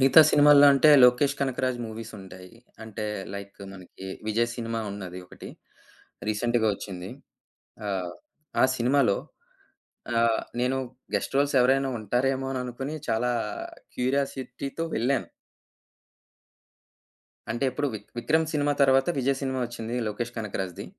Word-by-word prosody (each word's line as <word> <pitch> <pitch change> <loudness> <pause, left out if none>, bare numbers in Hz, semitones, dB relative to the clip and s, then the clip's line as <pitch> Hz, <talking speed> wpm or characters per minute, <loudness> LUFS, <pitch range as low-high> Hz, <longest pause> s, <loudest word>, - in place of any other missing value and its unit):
మిగతా 135 +4 +8
సినిమాల్లో 145 0 +7
అంటే 150 +3 +6
లోకేష్ 125 +3 +4
కనకరాజు 130 -2 -1
మూవీస్ 110 +1 -8
ఉంటాయి. 90 -1 -12 0.3
అంటే 110 0 -6 0.3
లైక్ 100 0 -8
మనకి 95 0 -11 0.2
విజయ్ 115 +2 +1
సినిమా 115 -1 -3
ఉన్నది 95 -3 -7
ఒకటి. - - -11 0.8
రీసెంట్‌గా 115 +1 +1
వచ్చింది. 95 -3 -7 0.8
ఆహ్, 95 -3 -2 0.5
ఆ - - +7
సినిమాలో 125 -3 +3 1.0
ఆహ్, 115 -1 +2 0.2
నేను 125 +2 +1 0.4
గెస్ట్ - - -1
రోల్స్ 140 +1 +2
ఎవరైనా 135 +2 +3
ఉంటారేమో 130 +5 0
అననుకోని 130 +3 -4
చాలా 120 +2 +1 0.6
క్యూరియాసిటీతో 135 +3 -2
వెళ్ళాను. 125 +3 0 2.2
అంటే 120 +4 -1
ఎప్పుడు 145 +3 -2
విక్ 105 - -8
విక్రమ్ 160 +6 +2
సినిమా 145 -1 +2
తర్వాత 135 +3 +4
విజయ్ 135 +1 +1
సినిమా 130 -1 -1
ఒచ్చింది. 120 0 -5
లోకేష్ 120 +3 -4
కనకరాజుది. 95 -4 -4
125 Hz, 115 wpm, -26 LUFS, 110-135 Hz, 2.2 s, మిగతా